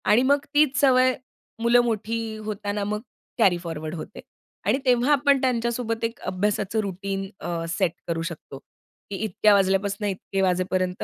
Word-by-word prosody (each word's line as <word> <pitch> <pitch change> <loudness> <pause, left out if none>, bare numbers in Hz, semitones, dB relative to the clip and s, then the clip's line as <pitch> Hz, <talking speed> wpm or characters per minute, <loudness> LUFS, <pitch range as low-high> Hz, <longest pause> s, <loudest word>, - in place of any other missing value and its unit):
आणि 215 +3 +5
मग 285 +2 +2
तीच 290 -2 +3
सवय 255 -2 +5 0.5
मुलं 235 +1 +5
मोठी 225 0 -2
होतांना 205 -1 -3
मग 210 +1 -2 0.4
कॅरी 195 -7 +4
फॉरवर्ड 160 -2 -5
होते. 170 - -8 0.5
आणि - - +3
तेव्हा 250 +2 +3
आपण 280 -1 +4
त्यांच्या 240 -3 +1
सोबत 230 -1 -3
एक 230 +1 -2
अभ्यासाचं 205 +2 -1
रूटीन 195 0 -4
अ, 170 -1 -3
सेट 170 +1 +1 0.2
करू 165 -1 -1
शकतो. 165 -5 -7 0.5
की 200 - -4
इतक्या 215 0 +3
वाजल्यापासून 200 +1 +1
इतके 195 0 -3
वाजेपर्यंत 185 0 0
210 Hz, 150 wpm, -24 LUFS, 185-235 Hz, 0.5 s, आणि